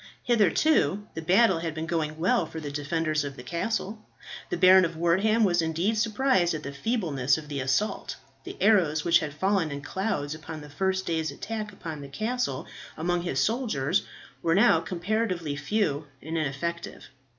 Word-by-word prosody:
Hitherto 210 - +2
the 160 - -5
battle 190 +2 +4
had 165 -1 -4
been 160 0 -3
going 155 -2 -2
well 170 0 +2
for 160 - -7
the 145 -2 -6
defenders 155 +1 -1
of 140 -1 -6
the 125 - -10
castle. 210 - -3 0.5
The - - -2
Baron 185 +1 +7
of 165 -2 -2
Wortham 195 +7 +3
was 175 -4 +3
indeed 165 +7 0
surprised 215 -5 +2
at 155 - -6
the 140 - -6
feebleness 145 - 0
of 150 -2 -9
the 145 -2 -3
assault. 135 +11 -1 0.3
The - - -8
arrows 175 -8 +3
which 170 0 +5
had 150 -2 -4
fallen 190 +2 0
in 140 -1 -6
clouds 190 -8 -2
upon 155 0 -8
the 150 0 -11
first 190 +4 -1
day's 160 -2 -1
attack 215 +8 -5
upon 160 -6 -7
the 140 - -8
castle 215 - -2 0.3
among 175 +2 0
his 170 -6 -2
soldiers 220 - +1 0.4
were 165 0 +2
now 225 +5 +5
comparatively 180 -4 -2
few 150 -2 -1
and 160 +4 -6
ineffective. 165 +3 -3
170 Hz, 175 wpm, -27 LUFS, 150-205 Hz, 0.5 s, Baron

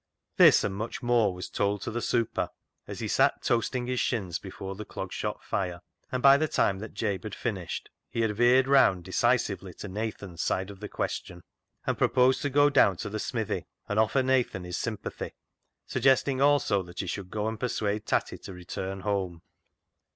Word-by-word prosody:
This, - - +7
and - - -1
much 110 +6 -5
more, 120 -4 +3
was 90 0 -6
told 100 0 -1
to - - -3
the 120 +2 -2
"super" 115 -1 0 0.4
as - - -6
he - - -2
sat - - +2
toasting 120 +1 0
his 125 0 -1
shins 95 -9 -1
before 95 0 -7
the 105 +2 -7
Clog - - -6
Shop - - -3
fire, 90 -3 -2 0.3
and 130 -1 -2
by 140 0 +8
the 155 +2 +1
time 95 -9 +1
that 110 +2 -8
Jabe 100 -5 -1
had 110 +1 -6
finished, 95 -8 -4 0.2
he 115 - -2
had 110 -2 0
veered 125 +3 +5
round 130 -10 +5
decisively 95 -2 0
to - - -7
Nathan's 100 -4 -5
side 95 +4 -1
of 100 - -12
the 105 - -6
question, 90 -1 -4 0.4
and - - -1
proposed 130 +1 +4
to 145 - 0
go 145 +1 +5
down 95 -8 +5
to 105 +2 -5
the 110 - -3
smithy 110 -1 -2 0.2
and 105 - 0
offer 110 +5 +3
Nathan 130 -7 +1
his 90 -1 -4
sympathy, 110 -4 -4 0.5
suggesting 130 +1 +2
also 140 -8 +3
that 90 0 -6
he - - -5
should 95 +1 -4
go 105 +1 -2
and 110 0 -3
persuade 110 -3 -1
Tatty - - 0
to 95 - -9
return 95 +2 -5
home. 95 -4 -2
105 Hz, 190 wpm, -28 LUFS, 95-120 Hz, 0.5 s, by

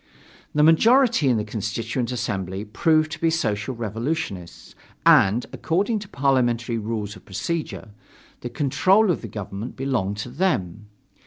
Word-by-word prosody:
The 150 - +4
majority 225 - +5
in 120 - +3
the 105 - -1
Constituent 110 +3 -3
Assembly 95 -4 -3
proved 155 +8 +2
to 160 - -6
be 165 - +3
Social 115 -6 -1
Revolutionists, 110 - -4 0.3
and, 105 +5 +5
according 200 +7 0
to 200 -1 -10
parliamentary 120 -4 +1
rules 105 -1 -4
of 95 - -15
procedure, 155 - -4 0.5
the 120 - -6
control 185 - +3
of 170 - -2
the 115 - -6
government 105 +2 -6
belonged 120 -7 -1
to 105 +4 -5
them. 120 - -1
120 Hz, 140 wpm, -23 LUFS, 105-160 Hz, 0.5 s, majority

